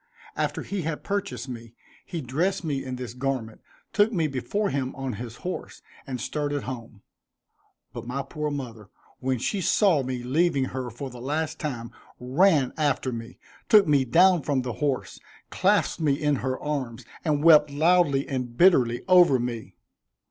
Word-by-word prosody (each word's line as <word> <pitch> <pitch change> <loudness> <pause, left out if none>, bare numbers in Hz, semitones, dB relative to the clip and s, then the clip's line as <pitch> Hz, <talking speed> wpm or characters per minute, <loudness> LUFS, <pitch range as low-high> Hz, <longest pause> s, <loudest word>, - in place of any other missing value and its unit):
After - - -2
he 200 -1 -3
had 160 -1 -4
purchased 195 - -3
me, 115 -2 -9 0.3
he 170 - -5
dressed 160 +10 -1
me 145 -4 -2
in 130 -1 -5
this 125 -2 -6
garment, 125 -4 -3 0.3
took 210 +1 +4
me 170 -7 +1
before 175 - -1
him 135 -2 -2
on 135 -2 -4
his 120 -2 -7
horse, 180 - -5 0.2
and 130 -2 -4
started 145 +2 -2
home; 115 -5 -8 0.9
but 120 -1 -7
my 135 +3 -3
poor 150 +2 -4
mother, 115 -8 -6 0.3
when 130 0 -1
she 190 - -2
saw 180 -4 +3
me 130 -1 -4
leaving 140 +1 +2
her 130 -1 -4
for 130 +3 -7
the 120 -1 -10
last 150 +4 -2
time, 120 -7 -4 0.3
ran 140 +2 +3
after 145 -4 0
me, 115 +1 -7 0.3
took 210 -2 +7
me 145 -3 +4
down 175 +6 +5
from 135 -3 0
the 125 -2 -3
horse, 140 +2 -2 0.3
clasped - - +1
me 150 -3 +3
in 145 0 +1
her 130 +1 -2
arms, 130 -5 -4 0.2
and 150 -3 0
wept 150 -3 +7
loudly 150 -1 +3
and 125 -3 -4
bitterly 130 -10 +4
over 180 -7 +6
me. 120 -2 -5
135 Hz, 165 wpm, -26 LUFS, 125-155 Hz, 0.9 s, took